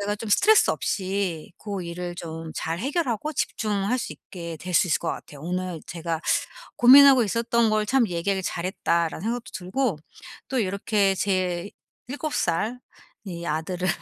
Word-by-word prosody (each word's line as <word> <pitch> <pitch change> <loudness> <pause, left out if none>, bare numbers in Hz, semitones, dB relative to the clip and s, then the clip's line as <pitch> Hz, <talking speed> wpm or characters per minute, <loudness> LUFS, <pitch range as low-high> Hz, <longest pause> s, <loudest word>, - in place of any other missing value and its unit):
제가 205 +1 -1
좀 220 +1 -6
스트레스 430 - +5
없이 190 -5 -2
고 200 -2 -5
일을 175 +1 -5
좀 165 -1 -7
잘 165 +1 -3
해결하고 285 - -1
집중할 210 -2 -1
수 - - -4
있게 170 -3 -8
될 180 -1 -5
수 175 - +5
있을 165 - +2
것 - - -4
같아요. 145 -2 -6
오늘 180 -1 -3
제가 165 -1 -3 0.6
'고민하고 270 +1 +8
있었던 230 +1 +1
걸 215 0 +1
참 250 0 +3
얘기하길 190 +2 -1
잘했다.'라는 170 -3 -1
생각도 235 +1 -3
들고 190 - -1 0.5
또 265 - -1
이렇게 200 -1 +1
제 185 -1 -1 0.4
7 290 +3 -4
살 210 +9 0 0.5
이 170 -2 -6
아들을 175 +4 -2
190 Hz, 295 characters per minute, -25 LUFS, 170-230 Hz, 0.6 s, 고민하고